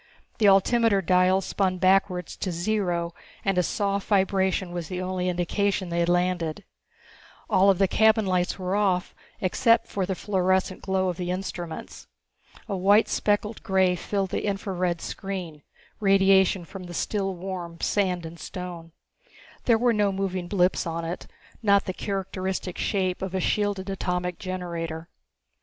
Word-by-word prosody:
The 210 - +5
altimeter 200 +2 +4
dials 185 +1 +3
spun 185 -2 0
backwards 185 -1 +2
to 185 - -2
zero 175 -2 -1 0.3
and 195 -1 +2
a 180 - +4
soft 200 +2 -1
vibration 190 -2 +1
was 175 -2 -4
the 180 +1 -4
only 185 0 -1
indication 185 +2 0
they 170 0 -1
had 170 0 +2
landed. 175 -3 0 0.9
All 195 +1 +5
of 195 - +4
the 195 - +3
cabin 220 +2 +4
lights 180 -1 0
were 185 0 -2
off 190 -3 +1 0.3
except 230 +5 +3
for 190 -2 -3
the 190 - -1
fluorescent 190 -1 0
glow 190 -1 0
of 175 - -4
the 180 -1 -3
instruments. 180 -3 -5 0.6
A 200 - -2
white 200 +4 +4
speckled 210 +1 0
grey 190 -1 +2
filled 195 +1 -2
the - - -2
infra 195 0 -2
red 175 -2 -1
screen, 180 -6 -5 0.4
radiation 195 -2 +4
from 185 +1 -9
the 175 -1 -8
still 195 0 -1
warm 175 -2 -6
sand 180 -4 0
and 165 +1 -9
stone. 170 -1 -7 0.7
There 230 -2 +5
were 240 +1 +3
no 205 -2 +2
moving 190 -2 -2
blips 180 -1 +1
on 165 0 -3
it, 170 +2 -5 0.3
not 200 -2 +4
the 185 - -3
characteristic 190 -2 -3
shape 185 -3 0
of 190 0 -3
a - - +1
shielded 205 0 0
atomic 180 -2 -2
generator. 170 -3 -5
185 Hz, 155 wpm, -26 LUFS, 180-195 Hz, 0.9 s, The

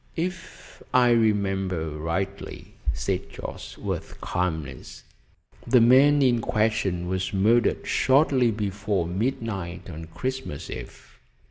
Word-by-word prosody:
"If 180 +1 -6
I 125 -1 +6
remember 95 -7 +1
rightly," 80 +5 -4 0.2
said - - -2
Jorce - - -8
with - - -5
calmness, 80 -6 -3 0.6
"the 125 - +6
man 135 +5 +6
in 120 -3 +3
question 105 -6 0
was 95 +1 -2
murdered 115 +5 +3
shortly 130 -2 +3
before 100 -3 -1
midnight 95 -3 -3
on 80 +1 -7
Christmas 130 - -5
Eve. - - -10
105 Hz, 105 wpm, -25 LUFS, 90-125 Hz, 0.6 s, I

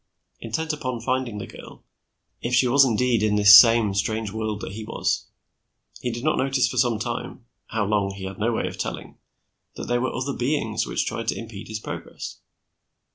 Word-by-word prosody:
Intent 160 +8 -3
upon 130 -5 -4
finding 125 -2 -2
the 100 - -5
girl, - - -13 0.6
if 125 +1 0
she 125 +1 +4
was 135 +3 +6
indeed 120 -2 +2
in 105 -1 +2
this 105 0 +9
same 115 -4 +7
strange 110 +2 -1
world 110 -1 -3
that - - -6
he 110 +2 -7
was, 110 - -2 0.7
he 125 - -2
did 120 +1 -5
not 155 - +1
notice 130 -2 +2
for 125 - -5
some 120 -2 +2
time 105 - -5 0.2
how 110 -2 -1
long, 100 -1 0
he 95 - -8
had 95 +1 -6
no 115 +3 +1
way 115 - -1
of - - -6
telling - - -5 0.6
that - - -6
there 120 0 +1
were 130 - -1
other 135 +2 -3
beings 125 -4 -1
which - - -1
tried - - -4
to - - 0
impede 110 -3 -8
his 110 0 -5
progress. - - -7
115 Hz, 195 wpm, -24 LUFS, 105-125 Hz, 0.7 s, this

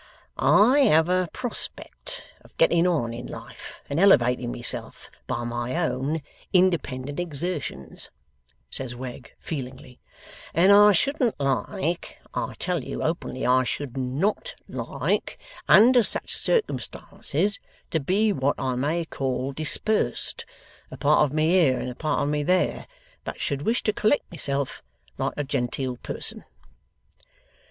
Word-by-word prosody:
'I 245 +8 +5
have 160 - +4
a 185 -1 +1
prospect 255 - -6 0.2
of - - -21
getting 170 +1 +4
on 140 -10 0
in 120 +1 -7
life - - -10
and 140 - -2
elevating 125 - +4
myself - - -5 0.2
by 120 -2 -2
my 120 +2 -3
own 155 -2 -1 0.3
independent 150 -7 +1
exertions,' 150 - -5 0.6
says 130 -2 -3
Wegg, 125 -1 -8
feelingly, 130 -4 -7 0.6
'and 180 +5 +6
I 205 +1 +8
shouldn't 250 - +1
like 140 +5 -2 0.2
I - - -3
tell 175 -6 0
you - - -5
openly 160 -5 -2
I 130 +1 +4
should 130 0 -4
NOT 150 - -1
like - - -2 0.3
under 245 +3 +7
such - - -1
circumstances, 215 - 0 0.3
to 160 - +1
be 200 +8 +2
what 140 -2 0
I 130 -1 -1
may 150 +7 -1
call 135 -3 -2
dispersed, 155 +9 0 0.4
a - - -9
part - - +4
of 140 - -4
me 155 +1 +1
here, 165 -8 +4
and 125 - -4
a - - -7
part 155 +5 -1
of 145 - 0
me 150 0 0
there, 180 +5 +1 0.4
but - - -6
should 140 -2 -2
wish 225 +10 0
to 215 - +1
collect 215 +7 +1
myself 140 -4 -3 0.4
like - - -1
a 145 - 0
genteel 125 -1 -2
person. - - 0
150 Hz, 135 wpm, -25 LUFS, 130-185 Hz, 0.6 s, I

